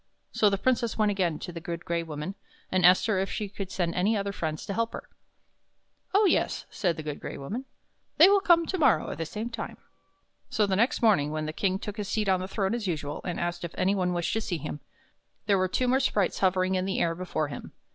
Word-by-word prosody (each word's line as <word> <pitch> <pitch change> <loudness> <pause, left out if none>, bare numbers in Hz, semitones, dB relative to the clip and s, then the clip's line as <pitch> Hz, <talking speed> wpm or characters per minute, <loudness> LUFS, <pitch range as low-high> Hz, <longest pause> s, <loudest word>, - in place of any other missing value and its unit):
So 210 - +4
the 200 - 0
Princess 235 0 0
went 215 -1 +3
again 180 -6 0
to 180 - -7
the 170 - -6
Good 170 0 -6
Gray 170 0 0
Woman, 155 +2 -5 0.4
and 185 -1 +2
asked 180 +1 +6
her 215 -4 +1
if 195 - -1
she 210 -2 -3
could 195 -1 -6
send 175 -3 -1
any 205 +5 +2
other 200 0 -2
friends 155 -5 -4
to 200 - -3
help 230 +2 -1
her. - - -7 0.5
" - - -44
Oh, 415 +1 +6
yes," 375 - +1
said 175 -5 0
the 155 - -5
Good 150 -1 -5
Gray - - -6
Woman. 205 - -5 0.3
" - - -46
They 330 - +9
will 400 0 +5
come 340 -3 +5
to 375 +2 -2
morrow 250 - +3
at - - -7
the 165 - -2
same 220 +7 -5
time." 230 -1 -6 0.7
So 215 - +2
the 195 -1 0
next 235 +6 +1
morning 195 -10 +4
when 155 0 -3
the 155 - -4
King 190 +2 0
took 210 +2 -7
his 205 -2 -3
seat 215 -2 0
on 185 -1 +3
his 185 - -5
throne 195 0 -1
as 235 -4 -2
usual, 150 -4 -3
and 175 - -3
asked 175 0 -2
if 170 - -6
any 190 +2 +2
one 180 -2 0
wished 175 -1 -1
to 225 - 0
see 180 -5 -2
him, 150 0 -6 0.7
there 200 -2 +3
were 185 - +2
two 250 +7 0
more 260 +2 +3
sprites 210 -8 +1
hovering 185 0 +2
in 185 0 0
the 195 - -1
air 165 - +2
before 165 -4 -2
him. - - -8
190 Hz, 255 wpm, -28 LUFS, 170-215 Hz, 0.7 s, They